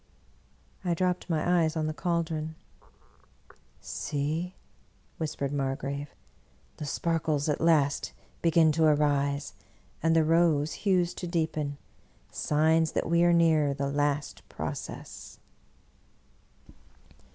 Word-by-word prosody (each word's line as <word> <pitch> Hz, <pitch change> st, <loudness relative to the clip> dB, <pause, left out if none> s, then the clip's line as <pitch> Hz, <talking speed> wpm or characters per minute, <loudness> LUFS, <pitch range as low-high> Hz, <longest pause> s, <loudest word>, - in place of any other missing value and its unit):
I 175 Hz, -2 st, 0 dB
dropped 180 Hz, +1 st, -1 dB
my 175 Hz, +2 st, +2 dB
eyes 160 Hz, 0 st, 0 dB
on 155 Hz, -, 0 dB
the 155 Hz, -, -2 dB
caldron. 160 Hz, -2 st, -2 dB, 0.7 s
" 65 Hz, -, -28 dB
See," 155 Hz, +5 st, -3 dB, 0.6 s
whispered 150 Hz, -3 st, -3 dB
Margrave, 140 Hz, +1 st, -3 dB, 0.4 s
" -, -, -35 dB
the 150 Hz, -, -5 dB
sparkles 160 Hz, -1 st, 0 dB
at 150 Hz, -, 0 dB
last 150 Hz, -4 st, +2 dB, 0.3 s
begin 165 Hz, -1 st, +4 dB
to 160 Hz, +2 st, +1 dB
arise, 145 Hz, -2 st, +1 dB, 0.5 s
and 165 Hz, +1 st, +3 dB
the 160 Hz, -1 st, +4 dB
rose 160 Hz, -2 st, +3 dB, 0.2 s
hues 180 Hz, -2 st, +2 dB
to 180 Hz, -, -6 dB
deepen 155 Hz, -4 st, -1 dB, 0.3 s
— -, -, -34 dB
signs 155 Hz, +8 st, +2 dB
that -, -, -1 dB
we 170 Hz, 0 st, +4 dB
near 160 Hz, -4 st, +3 dB
the 140 Hz, 0 st, -2 dB
last 145 Hz, 0 st, -1 dB
process." -, -, -7 dB
155 Hz, 115 wpm, -28 LUFS, 145-165 Hz, 0.7 s, begin